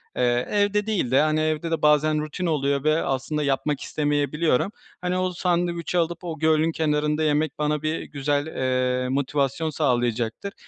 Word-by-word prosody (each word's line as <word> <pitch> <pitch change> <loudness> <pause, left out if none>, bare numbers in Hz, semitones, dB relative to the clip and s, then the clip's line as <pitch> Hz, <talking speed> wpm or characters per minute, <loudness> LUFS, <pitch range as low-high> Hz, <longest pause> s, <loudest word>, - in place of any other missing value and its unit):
eee, 120 0 +1
evde 205 0 +2
değil 180 - 0
de, 135 - +5
hani, 155 0 +2
evde 155 +1 -1
de 165 - -1
bazen 150 0 +3
rutin 155 +4 -4
oluyor 140 -4 0
ve 155 +1 +2
aslında 135 +3 -2
yapmak 140 +1 0
istemeyebiliyorum. 150 +3 0 0.3
Hani, 180 0 -1
o 185 0 0
sandviçi 175 0 -1
alıp, 170 +1 -1
o 165 -3 -5
gölün 160 +1 +3
kenarında 150 0 0
yemek 150 -1 0
bana 150 0 0
bir 155 +1 -2
güzel, 145 0 -1
eee, 130 -2 0
motivasyon 140 +3 0
sağlayacaktır. 120 - -1
150 Hz, 155 wpm, -24 LUFS, 140-165 Hz, 0.3 s, de